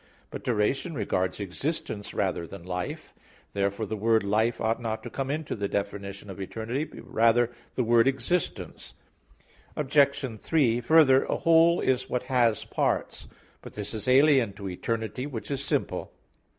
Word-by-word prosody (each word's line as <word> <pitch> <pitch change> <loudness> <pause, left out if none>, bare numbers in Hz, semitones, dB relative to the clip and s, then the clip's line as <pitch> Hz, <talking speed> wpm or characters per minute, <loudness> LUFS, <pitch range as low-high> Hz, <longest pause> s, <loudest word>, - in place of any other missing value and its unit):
But - - -7
duration 125 +8 0
regards 95 -5 -1
existence 105 - -4
rather 90 -4 -1
than 100 -1 -10
life. 90 0 -5 0.4
Therefore 100 +2 -1
the 110 +2 -4
word 110 +1 +2
"life" 110 +4 +1
ought 115 +2 0
not 110 -1 -3
to 120 - -7
come 135 -1 -3
into 150 +1 -2
the 100 -1 -2
definition 100 0 -4
of 95 0 -8
eternity; 115 +9 -3
but - - -12
rather 115 +1 +3 0.2
the 125 - +1
word 115 +1 +4
"existence." 135 +7 -2 0.8
Obj. 140 -4 +1
3: 125 -6 +2
Further, 135 0 +5
a - - -1
whole 165 +1 +5
is 130 -1 0
what 125 - -1
has 120 -4 +2
parts. - - -1 0.3
But - - -11
this 105 +1 -5
is 110 0 -5
alien 130 -4 +5
to 100 0 -7
eternity 110 +6 -3
which 130 -1 -6
is 140 -1 -2
simple. - - -2
115 Hz, 155 wpm, -27 LUFS, 100-135 Hz, 0.8 s, Further